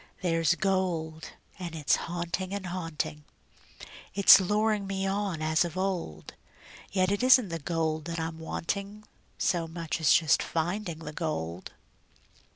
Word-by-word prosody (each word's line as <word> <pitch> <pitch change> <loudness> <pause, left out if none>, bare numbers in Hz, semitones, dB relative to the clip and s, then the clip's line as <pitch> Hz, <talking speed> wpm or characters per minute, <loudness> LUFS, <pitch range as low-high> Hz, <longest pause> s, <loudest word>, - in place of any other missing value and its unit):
There's 165 -1 +2
gold, 175 -4 -1 0.3
and 170 -3 -6
it's 150 -3 +2
haunting 175 +3 -3
and 200 -1 -5
haunting; 165 -4 -4 0.9
It's 200 0 +9
luring 210 +1 +1
me 195 0 -2
on 195 -4 -2
as 155 +1 +3
of 175 0 -5
old; 180 - -3 0.6
Yet 185 0 +2
it 205 - 0
isn't 255 -4 +6
the 165 0 -4
gold 160 -1 -2
that 170 0 -4
I'm 160 0 -4
wanting 200 +6 -4 0.3
So 170 -2 0
much 165 0 -4
as 145 -5 +4
just 160 -4 +4
finding 170 +1 -2
the 150 - -6
gold. 95 - -4
170 Hz, 140 wpm, -28 LUFS, 160-195 Hz, 0.9 s, It's